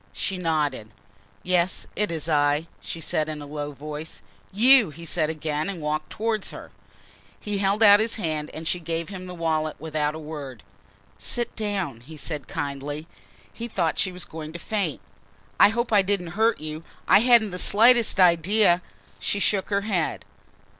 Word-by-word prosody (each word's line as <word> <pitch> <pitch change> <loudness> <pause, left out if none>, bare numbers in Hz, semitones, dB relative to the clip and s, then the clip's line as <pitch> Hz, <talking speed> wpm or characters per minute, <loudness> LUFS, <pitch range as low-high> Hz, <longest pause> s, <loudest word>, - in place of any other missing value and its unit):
She 190 -3 -3
nodded. 150 -9 -1 0.5
"Yes, 180 0 +1
it 210 -3 0
is 160 -1 -3
I," 145 0 +2
she 165 - -7
said 155 0 -1
in 155 -1 -4
a 145 - -8
low 145 0 -5
voice. 150 +2 -8 0.3
"You!" 240 +1 +6
he 165 +3 -11
said 160 -2 0
again 155 +1 -2
and 190 -3 -5
walked 155 0 -2
towards 220 -2 -2
her. - - -10 0.7
He 205 -1 -3
held 200 +3 +2
out 205 -1 +8
his 225 +1 0
hand 155 -6 -2
and 160 +1 -7
she 180 - 0
gave 165 0 -3
him 185 -2 -7
the 180 - -7
wallet 155 -2 -1
without 155 -1 -2
a - - -5
word. 145 -6 -8 0.6
"Sit 240 -1 -1
down," 195 - -2
he 155 +6 -12
said 150 -1 -4
kindly. 145 0 -4 0.5
He 235 - -5
thought 170 - -1
she 185 - +2
was 180 0 -4
going 155 -1 -8
to - - -5
faint. 190 -2 -2 0.6
"I - - +8
hope 235 +1 -1
I 205 - +6
didn't 190 -3 -1
hurt 225 +2 +2
you? 155 +1 -6 0.2
I - - +7
hadn't 230 -3 +5
the 180 - -4
slightest 230 +1 +4
idea 180 +1 +4 0.2
" - - -28
She 200 - -1
shook 200 -1 +1
her 200 0 +1
head. 195 -6 -2
170 Hz, 180 wpm, -25 LUFS, 155-205 Hz, 0.7 s, out